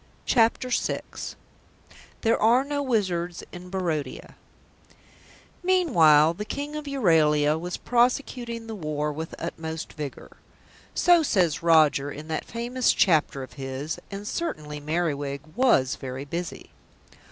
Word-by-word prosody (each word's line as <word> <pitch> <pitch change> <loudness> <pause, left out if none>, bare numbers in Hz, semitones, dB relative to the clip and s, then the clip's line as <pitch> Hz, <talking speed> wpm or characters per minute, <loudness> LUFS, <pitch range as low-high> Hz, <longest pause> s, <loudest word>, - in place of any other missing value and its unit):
CHAPTER 235 +1 +2
VI 245 - 0 1.2
THERE 225 -1 +2
ARE 235 +4 +5
NO 285 0 -2
WIZARDS 185 -9 -1
IN 180 0 -10
BARODIA 165 -7 -3 1.3
Meanwhile 170 - +5
"the 205 +5 -5
King 285 +7 -5
of 300 -1 -5
Euralia 160 - +3
was 175 +1 -4
prosecuting 240 -1 0
the 225 - -6
war 150 -5 -2
with 160 +2 -6
utmost 160 -1 -5
vigour." 150 -3 -8 0.6
So 350 -1 +5
says 180 - +1
Roger 155 -4 +4
in 150 +3 -9
that 160 - -2
famous 240 +2 0
chapter 155 -6 +2
of 130 - -11
his, 135 +2 -5
and 200 +1 -7
certainly 150 - -4
Merriwig 145 -3 -2
was 235 - +3
very 130 0 -6
busy. 170 +4 -6
170 Hz, 120 wpm, -26 LUFS, 150-235 Hz, 1.3 s, ARE